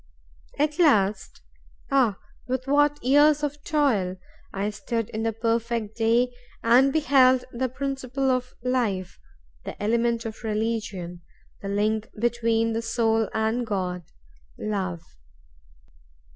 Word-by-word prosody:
At 295 +2 0
last—ah, 225 - 0 0.3
with 255 0 -2
what 290 0 +2
years 295 +3 +4
of 290 0 -3
toil!—I 200 -7 -1
stood 220 +2 -3
in 220 - -3
the 225 0 0
perfect 230 -1 -1
day, 235 +2 +2 0.3
and 250 +4 +5
beheld 260 -4 +4
the 255 +2 -2
principle 270 0 -2
of 255 0 -2
life, 225 -8 -1 0.4
the - - -8
element 230 +2 +1
of 225 +1 -7
religion, 210 -5 -3 0.4
the 195 - -5
link 215 +2 0
between 230 -1 +1
the 225 - -1
soul 225 -1 +1
and 220 +2 0
God—Love!" 180 - -5
230 Hz, 105 wpm, -25 LUFS, 210-255 Hz, 0.4 s, and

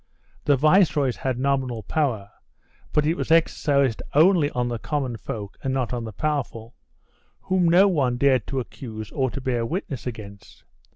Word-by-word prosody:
The 145 - +4
viceroys 150 -4 +3
had 130 -2 -2
nominal 130 -4 -1
power, 115 -6 -1 0.6
but 150 - +2
it 160 - +2
was - - -4
exercised 140 -6 +2
only 160 -1 +5
on 125 -3 -2
the 120 -1 -3
common 130 +3 -2
folk 105 -1 -7
and 135 - -2
not 130 -2 -1
on 120 -2 -3
the 110 - -6
powerful, 125 -3 -3 0.7
whom 185 -2 +1
no 185 +4 +6
one 135 -10 +1
dared 130 -3 +2
to 135 - -2
accuse 110 -4 -8
or 130 -2 0
to 140 - -6
bear 125 -3 -1
witness 135 - -4
against. 100 -4 -9
130 Hz, 165 wpm, -24 LUFS, 115-150 Hz, 0.7 s, no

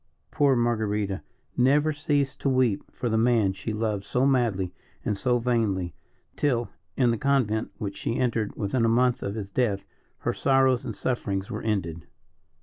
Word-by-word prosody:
Poor 140 -2 +3
Marguerita 105 -4 0 0.3
never 145 +5 +3
ceased 145 -2 0
to 140 - +1
weep 130 -6 +1
for 125 - -3
the 110 -1 +2
man 115 -5 +3
she 110 - -5
loved 105 -2 -1
so 125 +5 +1
madly 115 -9 +1 0.3
and 105 - +1
so 125 +4 +1
vainly, 110 -7 0 0.4
till, 120 -5 0 0.3
in 125 -3 +4
the 115 - -1
convent 125 -6 +1
which 100 -3 -5
she 115 - -2
entered 115 -4 0
within 115 +4 0
a 115 - +4
month 125 +1 +3
of 100 +1 -3
his 100 -3 -5
death, 105 -4 0 0.4
her - - 0
sorrows 130 -2 +3
and - - -5
sufferings 100 -6 -2
were - - -4
ended. 85 -7 -2
115 Hz, 165 wpm, -26 LUFS, 100-130 Hz, 0.4 s, in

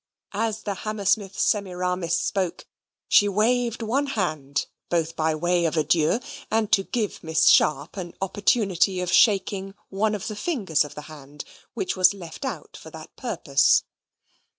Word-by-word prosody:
As 220 +1 -2
the 205 - -2
Hammersmith 200 -1 -1
Semiramis 180 -4 0
spoke, 185 -3 -2 0.4
she 205 - +5
waved 235 +3 +1
one 270 +6 0
hand, 155 - -2 0.2
both 165 -1 -1
by 160 0 0
way 175 +2 +1
of 165 0 -1
adieu, 155 +5 +2 0.3
and 220 -1 0
to 195 - +5
give 215 +1 -3
Miss 160 -1 +1
Sharp 150 +5 +3
an 175 -2 -6
opportunity 195 -1 +1
of 180 0 -2
shaking 195 -1 +2
one 210 +2 0
of 205 - -6
the 215 - -4
fingers 205 - 0
of 150 - -10
the 150 - -7
hand 145 -1 -11 0.3
which 380 -2 -2
was 185 +2 +4
left 175 - -8
out 265 - -6
for - - -11
that - - -12
purpose. - - +2
190 Hz, 150 wpm, -24 LUFS, 165-215 Hz, 0.4 s, she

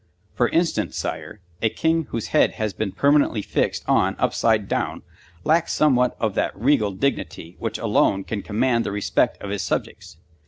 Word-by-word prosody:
For - - +1
instance, - - 0
Sire, 105 - -5 0.2
a 110 - +3
king 160 +5 0
whose 115 -4 -5
head - - +3
has 110 -2 -3
been 100 +1 -3
permanently 140 -1 +2
fixed - - -1
on - - +2
upside 110 -3 +1
down - - -2 0.4
lacks 165 +2 +2
somewhat 125 -5 +2
of 110 -3 0
that 95 - -2
regal 115 -3 +3
dignity 95 -5 -3
which 115 -1 -3
alone 105 -3 +1
can 105 0 -4
command 115 +3 +1
the - - -3
respect 105 0 0
of 100 - -5
his 100 - -2
subjects. 75 - -4
110 Hz, 165 wpm, -23 LUFS, 100-130 Hz, 0.4 s, a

